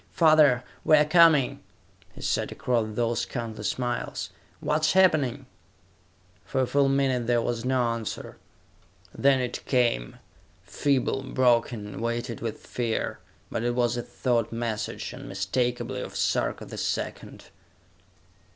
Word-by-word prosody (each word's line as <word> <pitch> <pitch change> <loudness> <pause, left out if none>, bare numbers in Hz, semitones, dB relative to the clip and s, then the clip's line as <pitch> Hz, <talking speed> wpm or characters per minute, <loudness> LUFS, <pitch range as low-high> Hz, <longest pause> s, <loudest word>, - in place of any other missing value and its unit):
"Father, 155 -6 +5 0.2
we 155 - +6
are 150 - +4
coming!" 155 -4 +5 0.6
he - - -11
said, - - 0
across 115 -4 -1
those 115 0 0
countless 110 -4 -4
miles. 120 -1 -3 0.3
"What 155 +1 0
is 155 - +3
happening?" 155 -9 +3 1.0
For 130 - -1
a - - +2
full 140 +2 +2
minute 135 -3 +1
there 120 -1 +3
was 115 0 -2
no 130 -1 +2
answer. 115 -2 -4 0.8
Then 135 -1 +3
it 125 -1 -3
came, 120 - +1 0.5
feeble, 135 +7 0
broken, 120 -5 0
weighted 115 0 -3
with 115 -2 -5
fear; 115 -2 -2 0.3
but - - -2
it 120 0 0
was 120 -1 +1
a 120 - -2
thought 120 -2 -1
message, 115 -2 -3
unmistakably, 125 -1 -2
of - - -7
Sarka - - 0
the - - -8
Second. - - -4
120 Hz, 130 wpm, -26 LUFS, 115-135 Hz, 1.0 s, we